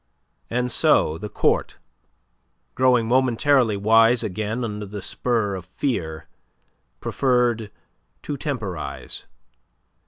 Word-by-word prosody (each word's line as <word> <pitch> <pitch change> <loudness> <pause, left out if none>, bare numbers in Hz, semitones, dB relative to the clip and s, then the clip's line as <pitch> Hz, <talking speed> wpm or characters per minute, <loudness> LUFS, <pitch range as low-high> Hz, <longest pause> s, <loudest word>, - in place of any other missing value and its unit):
And 125 +1 -1
so 80 -7 +3
the 105 - -6
Court, - - 0 1.0
growing 125 -3 +3
momentarily 125 -2 +3
wise 115 +3 +4
again 110 +4 -3
under 105 -2 -4
the 105 +1 -6
spur 110 0 -1
of 95 -2 -6
fear, 85 - -3 0.7
preferred 120 -5 +1 0.5
to 145 - -3
temporize. 110 - -4
115 Hz, 95 wpm, -23 LUFS, 105-125 Hz, 1.0 s, wise